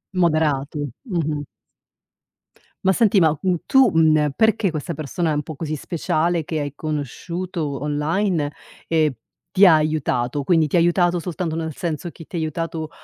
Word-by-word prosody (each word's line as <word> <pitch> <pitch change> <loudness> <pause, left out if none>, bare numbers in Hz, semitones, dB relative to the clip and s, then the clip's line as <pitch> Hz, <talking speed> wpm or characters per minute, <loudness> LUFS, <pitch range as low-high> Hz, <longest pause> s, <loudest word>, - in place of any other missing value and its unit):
Moderato, 150 -4 +1 0.2
mh-mh. 155 -5 -1 1.4
Ma 190 - +5
senti 205 -2 +4
ma, 155 -2 +3
mhmm, 185 -1 +2
tu, 265 -5 +5
mhmm, 160 -1 +5
ehm, 150 -1 +1
perché 220 -3 +3
questa 155 +1 -4
persona 155 +2 -2
è - - +1
un 145 - 0
po' 155 +1 -8
così 155 +1 -4
speciale 170 +2 -1
che 155 +1 -3
hai 145 -1 -4
conosciuto 155 +1 -4
online 150 +2 0 0.4
e 155 -4 +2 0.4
ti 195 +1 +7
ha 175 -4 +8
aiutato; 145 -3 0
quindi 160 +1 +3
ti 150 - -2
ha - - +6
aiutato 175 +1 +3
soltanto 165 -1 -3
nel 160 -2 -3
senso 170 +1 -4
chi 165 - -12
ti 180 - -9
ha - - 0
aiutato, 160 0 -3
160 Hz, 165 wpm, -22 LUFS, 150-175 Hz, 1.4 s, ha